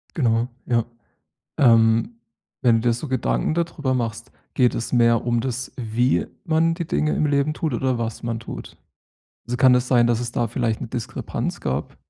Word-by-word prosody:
Genau, 115 Hz, -5 st, +1 dB, 0.2 s
ja. 120 Hz, -2 st, +1 dB, 0.7 s
Ähm, 115 Hz, -2 st, +4 dB, 0.5 s
wenn 120 Hz, -3 st, +5 dB
du 115 Hz, +2 st, +1 dB
dir -, -, +4 dB
so 120 Hz, +6 st, -5 dB
Gedanken 85 Hz, -, 0 dB
da 170 Hz, +1 st, +2 dB
drüber 145 Hz, -5 st, -3 dB
machst, 115 Hz, -1 st, -3 dB, 0.2 s
geht 125 Hz, -2 st, +3 dB
es 115 Hz, -, -4 dB
mehr 115 Hz, -2 st, +3 dB
um 120 Hz, -1 st, +1 dB
das, 130 Hz, +1 st, -4 dB
wie 120 Hz, +1 st, 0 dB, 0.2 s
man 165 Hz, +1 st, +2 dB
die 170 Hz, 0 st, -4 dB
Dinge 155 Hz, -1 st, 0 dB
im 155 Hz, -, +1 dB
Leben 145 Hz, +1 st, +1 dB
tut 155 Hz, -1 st, -2 dB
oder 130 Hz, +1 st, 0 dB
was 115 Hz, -1 st, -4 dB
man 115 Hz, -1 st, -3 dB
tut? -, -, -9 dB, 0.7 s
Also, 120 Hz, +1 st, -2 dB
kann 130 Hz, 0 st, +6 dB
es 125 Hz, 0 st, +1 dB
sein, 120 Hz, -2 st, +4 dB
dass 120 Hz, -1 st, +1 dB
es 120 Hz, -1 st, -3 dB
da 120 Hz, -, 0 dB
vielleicht 115 Hz, -1 st, -1 dB
'ne -, -, -4 dB
Diskrepanz 115 Hz, 0 st, -4 dB
gab? 65 Hz, +3 st, -3 dB
120 Hz, 190 wpm, -22 LUFS, 115-130 Hz, 0.7 s, kann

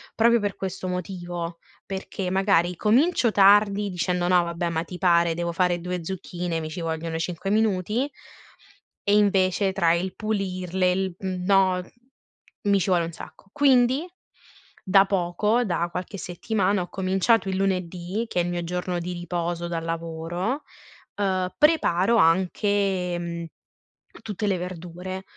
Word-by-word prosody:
proprio 235 Hz, +1 st, +4 dB
per 205 Hz, -1 st, -2 dB
questo 190 Hz, 0 st, -5 dB
motivo, 175 Hz, -2 st, -5 dB, 0.3 s
perché 190 Hz, -1 st, -4 dB
magari 185 Hz, -2 st, +2 dB
comincio 240 Hz, +2 st, +3 dB
tardi, 205 Hz, 0 st, +5 dB
dicendo: 180 Hz, 0 st, -1 dB
"No, 180 Hz, -1 st, +5 dB
vabbè, 170 Hz, 0 st, -2 dB
ma 165 Hz, 0 st, -1 dB
ti 180 Hz, -, -8 dB
pare, 170 Hz, -2 st, +3 dB
devo 170 Hz, +1 st, -2 dB
fare 180 Hz, -1 st, +1 dB
2 180 Hz, 0 st, -3 dB
zucchine 175 Hz, -2 st, -4 dB
mi 155 Hz, -, -5 dB
ci 170 Hz, +2 st, -6 dB
vogliono 160 Hz, 0 st, -3 dB
5 180 Hz, +3 st, -3 dB
minuti" 215 Hz, +5 st, +1 dB, 0.9 s
e 200 Hz, -, +2 dB
invece 195 Hz, -1 st, +2 dB
tra 170 Hz, -4 st, +3 dB
il 180 Hz, +2 st, -2 dB
pulirle, 185 Hz, -3 st, -1 dB
il 185 Hz, -1 st, -1 dB
mhmm, 185 Hz, -2 st, -4 dB
no, 190 Hz, -2 st, +3 dB, 0.8 s
mi 200 Hz, -2 st, +3 dB
ci 190 Hz, -, -1 dB
vuole 175 Hz, -2 st, +3 dB
un 165 Hz, -, -6 dB
sacco. 195 Hz, -, -12 dB
Quindi, 270 Hz, +1 st, +3 dB, 0.8 s
da 195 Hz, +1 st, +5 dB
poco, 195 Hz, +5 st, +1 dB
da 175 Hz, -5 st, -1 dB
qualche 185 Hz, +3 st, -5 dB
settimana, 195 Hz, +2 st, -1 dB
ho 175 Hz, -, -6 dB
cominciato 195 Hz, +4 st, +1 dB
il 190 Hz, -, -1 dB
lunedì, 185 Hz, +2 st, -2 dB
che 180 Hz, -, 0 dB
è -, -, 0 dB
il 175 Hz, -, -2 dB
mio 175 Hz, 0 st, -2 dB
giorno 180 Hz, +1 st, -2 dB
di 180 Hz, +1 st, -4 dB
riposo 175 Hz, 0 st, -3 dB
dal 165 Hz, -1 st, -3 dB
lavoro, 165 Hz, -, -3 dB, 0.5 s
uhm, 185 Hz, -2 st, 0 dB
preparo 235 Hz, -, +3 dB
anche, 190 Hz, 0 st, +2 dB
mhmm, 170 Hz, -1 st, -5 dB, 0.8 s
tutte 210 Hz, -1 st, -3 dB
le 195 Hz, -2 st, +1 dB
verdure, 180 Hz, +1 st, -6 dB
185 Hz, 145 wpm, -25 LUFS, 175-200 Hz, 0.9 s, tardi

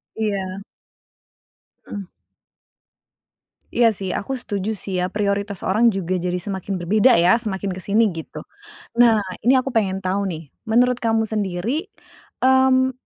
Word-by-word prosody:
Iya. 195 Hz, -3 st, -2 dB, 1.3 s
Ah. 200 Hz, -3 st, -7 dB, 1.6 s
Iya 235 Hz, -2 st, +3 dB
sih, 195 Hz, -1 st, -5 dB
aku 270 Hz, -, -3 dB
setuju 205 Hz, -2 st, -3 dB
sih 195 Hz, -2 st, -4 dB
ya, 180 Hz, +1 st, -1 dB
prioritas 200 Hz, -1 st, -1 dB
orang 225 Hz, +5 st, +3 dB
juga 185 Hz, -1 st, -2 dB
jadi 180 Hz, 0 st, -2 dB
semakin 190 Hz, 0 st, -4 dB
berbeda 215 Hz, +8 st, +4 dB
ya, 175 Hz, +6 st, +5 dB
semakin 200 Hz, -4 st, -3 dB
kesini, 205 Hz, +4 st, +2 dB
gitu. 165 Hz, -3 st, -7 dB, 0.6 s
Nah, 225 Hz, -3 st, +5 dB, 0.2 s
ini 255 Hz, +4 st, +4 dB
aku 260 Hz, +1 st, 0 dB
pengen 195 Hz, -4 st, 0 dB
tahu 195 Hz, +2 st, 0 dB
nih. 165 Hz, -2 st, -6 dB, 0.2 s
Menurut 245 Hz, +2 st, +3 dB
kamu 225 Hz, -1 st, +1 dB
sendiri, 215 Hz, -, -2 dB, 0.5 s
mmm, 260 Hz, 0 st, +4 dB
205 Hz, 130 wpm, -21 LUFS, 190-230 Hz, 1.6 s, ya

